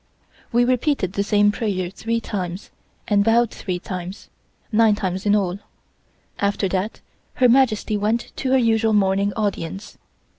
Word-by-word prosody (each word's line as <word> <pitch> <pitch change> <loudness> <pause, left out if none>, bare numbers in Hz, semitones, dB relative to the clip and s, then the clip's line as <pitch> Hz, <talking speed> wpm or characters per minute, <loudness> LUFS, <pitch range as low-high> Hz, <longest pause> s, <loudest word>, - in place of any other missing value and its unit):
We 240 +1 +3
repeated 250 - 0
the 200 - 0
same 205 0 +3
prayer 195 -6 -2
three 230 +3 -2
times, 185 -4 -5 0.4
and 205 -1 +3
bowed 230 +1 +3
three 185 -2 -4
times 180 +1 -7 0.4
nine 220 -1 +4
times 190 -1 -3
in 205 - +4
all. 195 -2 -1 0.8
After 200 0 0
that 190 +4 -3 0.3
Her 255 - +4
Majesty 230 -4 +2
went 215 +3 -1
to 260 - -2
her - - +6
usual 225 -2 +2
morning 200 0 +2
audience. 200 -3 -4
205 Hz, 145 wpm, -22 LUFS, 190-230 Hz, 0.8 s, her